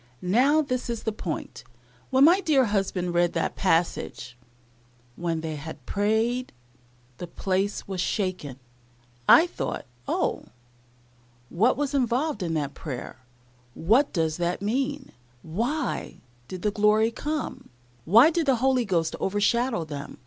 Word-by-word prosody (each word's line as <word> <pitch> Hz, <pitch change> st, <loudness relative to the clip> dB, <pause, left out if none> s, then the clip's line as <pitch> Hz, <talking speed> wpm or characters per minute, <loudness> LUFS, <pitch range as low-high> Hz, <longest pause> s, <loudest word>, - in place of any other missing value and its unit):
Now 285 Hz, +7 st, +4 dB
this 255 Hz, -3 st, -3 dB
is 235 Hz, -2 st, -3 dB
the 220 Hz, -, -1 dB
point, 170 Hz, -, -6 dB, 0.5 s
when 265 Hz, +1 st, +4 dB
my 350 Hz, +6 st, +6 dB
dear 290 Hz, -8 st, +3 dB
husband 195 Hz, -4 st, -1 dB
read 175 Hz, 0 st, +2 dB
that 165 Hz, -, -1 dB
passage, 165 Hz, -8 st, -1 dB, 0.8 s
"When 165 Hz, -2 st, -2 dB
they 160 Hz, -1 st, -4 dB
had 145 Hz, -3 st, -9 dB
prayed, 220 Hz, +5 st, 0 dB, 0.7 s
the 175 Hz, -, -5 dB
place 195 Hz, +3 st, -2 dB
was 190 Hz, -2 st, -3 dB
shaken," 185 Hz, -, -2 dB, 0.7 s
I 325 Hz, -, +8 dB
thought, 355 Hz, -, -5 dB, 0.2 s
Oh! -, -, -1 dB, 1.0 s
what 225 Hz, +9 st, +2 dB
was 285 Hz, 0 st, -1 dB
involved 255 Hz, -1 st, 0 dB
in 165 Hz, -2 st, -2 dB
that 145 Hz, -2 st, -2 dB
prayer 135 Hz, -6 st, -7 dB, 0.6 s
what 230 Hz, -, +3 dB
does 160 Hz, -3 st, -1 dB
that 175 Hz, 0 st, -1 dB
mean? 265 Hz, +7 st, -2 dB, 0.3 s
Why 240 Hz, -, -3 dB, 0.3 s
did 185 Hz, -1 st, -8 dB
the 210 Hz, -, +1 dB
glory 215 Hz, +2 st, +3 dB
come? 300 Hz, +5 st, -4 dB, 0.3 s
Why 230 Hz, -, +6 dB
did 330 Hz, -2 st, -1 dB
the 265 Hz, -, +4 dB
Holy 255 Hz, 0 st, +2 dB
Ghost 170 Hz, -5 st, 0 dB
overshadow 205 Hz, 0 st, +1 dB
them? 145 Hz, -2 st, -7 dB
210 Hz, 135 wpm, -26 LUFS, 170-260 Hz, 1.0 s, I